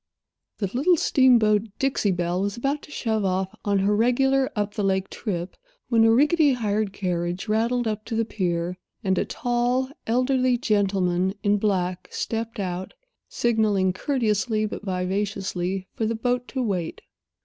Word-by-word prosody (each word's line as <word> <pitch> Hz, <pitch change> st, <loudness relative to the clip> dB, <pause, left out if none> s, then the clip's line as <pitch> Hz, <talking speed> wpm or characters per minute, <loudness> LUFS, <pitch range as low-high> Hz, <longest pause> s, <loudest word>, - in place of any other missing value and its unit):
The 205 Hz, -, -1 dB
little 320 Hz, +8 st, +3 dB
steamboat 225 Hz, -7 st, +4 dB
Dixie 270 Hz, -6 st, +1 dB
Belle 175 Hz, 0 st, -1 dB
was 200 Hz, +2 st, -2 dB
about 275 Hz, +4 st, -1 dB
to -, -, -14 dB
shove 220 Hz, -7 st, -1 dB
off 190 Hz, +1 st, -1 dB
on 200 Hz, -1 st, +1 dB
her 200 Hz, +2 st, +2 dB
regular 265 Hz, +4 st, +2 dB
up 205 Hz, -1 st, -1 dB
the 210 Hz, -, -2 dB
lake 190 Hz, -1 st, 0 dB
trip, 180 Hz, -5 st, -4 dB, 0.3 s
when 225 Hz, -2 st, +4 dB
a 225 Hz, -, +6 dB
rickety 295 Hz, +4 st, +4 dB
hired 215 Hz, -3 st, -1 dB
carriage 175 Hz, 0 st, -2 dB
rattled 230 Hz, +3 st, +1 dB
up 215 Hz, -1 st, -2 dB
to 225 Hz, -, -4 dB
the 225 Hz, 0 st, +1 dB
pier, 180 Hz, -3 st, -2 dB, 0.2 s
and 190 Hz, -2 st, +1 dB
a -, -, 0 dB
tall, 245 Hz, +2 st, 0 dB, 0.2 s
elderly 255 Hz, +1 st, +2 dB
gentleman, 190 Hz, -4 st, +1 dB
in 205 Hz, 0 st, +3 dB
black, 185 Hz, -3 st, -1 dB
stepped 225 Hz, -1 st, -4 dB
out, 185 Hz, -1 st, -4 dB, 0.3 s
signaling 210 Hz, -5 st, +1 dB
courteously 215 Hz, -2 st, 0 dB
but 210 Hz, -, -5 dB
vivaciously 190 Hz, -1 st, -2 dB
for 220 Hz, -, -1 dB
the 230 Hz, -, -1 dB
boat 245 Hz, +2 st, -1 dB
to 260 Hz, -2 st, -2 dB
wait. 185 Hz, -7 st, -2 dB
210 Hz, 155 wpm, -24 LUFS, 190-240 Hz, 0.3 s, a